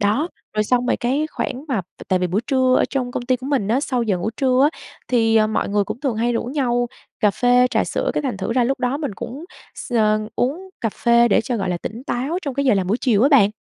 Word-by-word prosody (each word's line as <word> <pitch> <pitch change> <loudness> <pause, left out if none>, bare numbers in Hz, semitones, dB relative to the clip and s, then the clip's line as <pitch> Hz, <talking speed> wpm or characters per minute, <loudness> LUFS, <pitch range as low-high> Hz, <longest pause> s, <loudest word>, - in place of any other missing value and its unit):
Đó, 220 - +1 0.3
rồi 215 0 +1
xong 250 +2 +1
rồi - - +2
cái 270 +6 0
khoảng 260 +3 -4
mà 235 -7 0 0.2
t - - -11
tại 185 - +2
vì 180 - 0
buổi 185 +5 0
trưa 260 -2 +3
ở - - +3
trong 255 -3 -2
công - - -3
ty 255 0 +2
của 255 +2 -9
mình 265 -9 0
á, 250 +5 +2
sau 255 -5 -1
giờ 200 -5 0
ngủ 220 +5 -2
trưa 260 -1 +3
á, - - -16 0.3
thì, 225 -2 +3
à, 215 0 +5
mọi 215 - -1
người 205 0 +1
cũng 215 +4 -6
thường 265 -6 -1
hay 235 +2 +1
rủ 230 - -1
nhau 245 -2 0 0.3
cà 210 - +4
phê, 245 +3 +3
trà - - +1
sữa, - - -1
cái - - 0
thành 255 -7 -2
thử 190 +4 -3
ra 250 -1 +2
lúc 270 +1 -1
đó 250 +2 0
mình 285 -10 -4
cũng 270 - -7 0.3
x 245 - -8
ờ, 215 -2 +3 0.2
uống 325 +10 -1
cà 230 - 0
phê 235 +1 +3
để - - +4
cho, 245 0 -3
gọi 190 -3 -2
là, 180 - 0
tỉnh 230 +7 -7
táo 275 +8 -2
trong 280 -5 -4
cái 280 0 0
giờ 255 -5 +4
làm 190 -2 0
buổi 210 +5 +1
chiều 225 -4 +2
á 275 - +5
bạn. 235 -9 +5
245 Hz, 280 wpm, -21 LUFS, 215-265 Hz, 0.3 s, à